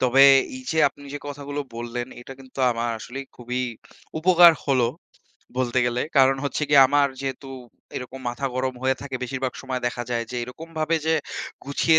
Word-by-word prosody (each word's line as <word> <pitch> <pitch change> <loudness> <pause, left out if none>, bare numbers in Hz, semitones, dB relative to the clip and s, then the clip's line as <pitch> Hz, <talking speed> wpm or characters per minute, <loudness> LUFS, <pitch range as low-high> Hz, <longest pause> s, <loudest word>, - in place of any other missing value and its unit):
তবে 130 +1 +5 0.3
এইযে 245 -11 -3
আপনি 145 +1 -16
যে - - -3
কথাগুলো 145 0 -5
বললেন 120 +1 -4
এটা 135 - -9
কিন্তু 130 0 -14
আমার 115 0 -1
আসলেই 135 +5 -7
খুবই 125 +1 -3 0.6
উপকার 175 0 +7
হলো 130 -4 +3 0.7
বলতে 125 -1 +1
গেলে। 120 0 0 0.2
কারণ 135 0 +6
হচ্ছে 140 +1 -2
গিয়ে 145 - +8
আমার 145 0 +4
যেহেতু 135 0 -5 0.5
এরকম 130 +1 -6
মাথা 125 +3 -3
গরম 130 0 -1
হয়ে 130 0 +2
থাকে, 140 -2 -4
বেশিরভাগ 130 0 -2
সময় 130 -1 -3
দেখা 120 0 -2
যায় 115 -1 0
যে 125 - -4
এরকমভাবে 160 +5 -2
যে 160 - +4 0.5
গুছিয়ে 160 +3 +3
135 Hz, 165 wpm, -24 LUFS, 125-145 Hz, 0.7 s, গিয়ে